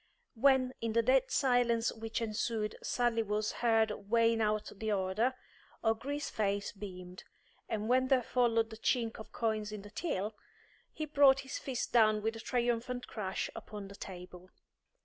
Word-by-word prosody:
When, 255 +1 +3
in 230 -1 -1
the 230 0 +3
dead 260 +2 +3
silence 245 -3 +2
which 225 +1 -4
ensued, 215 -1 -2
Sally 240 -2 +1
was 210 0 -1
heard 225 -2 +2 0.2
weighing 230 0 +3
out 215 0 0
the 220 +1 -2
order, 205 +6 +1 0.5
O'Gree's 265 +6 -1
face 200 -1 -1
beamed; 185 -3 -9 0.5
and 215 -1 -2
when 255 +2 +3
there 260 -2 +3
followed 230 -2 +2
the 220 - -8
chink 230 0 0
of 220 - -10
coins 215 -2 -1
in 210 -2 -7
the 205 - -11
till, 220 - -2 0.6
he 310 - -4
brought 280 -2 +5
his 270 0 -5
fist 260 -3 -3
down 215 -3 +4
with 225 +1 -1
a - - -7
triumphant 245 +1 -1
crash 190 -4 -3
upon 205 -2 -8
the 200 - -10
table. 180 -1 -9
225 Hz, 160 wpm, -33 LUFS, 210-245 Hz, 0.6 s, brought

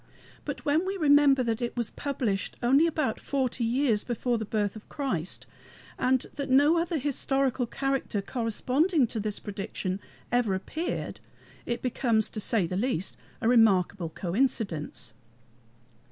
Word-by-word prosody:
But - - -5
when 300 +4 +3
we 385 +1 -2
remember 285 -4 +5
that 230 0 -1
it 240 0 -3
was 235 -2 -1
published 245 -8 -2
only 275 +7 +5
about 305 -8 -1
forty 260 -3 -1
years 235 -2 +2
before 240 0 -1
the 220 - -3
birth 205 -1 -1
of 215 - -12
Christ, 200 - -3 0.5
and 255 0 +2
that 280 -2 -4
no 290 +6 +5
other 335 0 -1
historical 270 -2 0
character 270 -5 -1
corresponding 255 - +1
to 225 -1 -4
this 210 -1 -3
prediction 195 -2 -4 0.3
ever 240 -5 +2
appeared, 315 - -4 0.5
it 235 -1 -2
becomes, 235 -3 +1
to 215 - -4
say 210 -2 +1
the 180 - -4
least, 200 -5 -1 0.3
a - - +1
remarkable 200 -7 +4
coincidence. 175 - -2
240 Hz, 140 wpm, -28 LUFS, 210-275 Hz, 0.5 s, remember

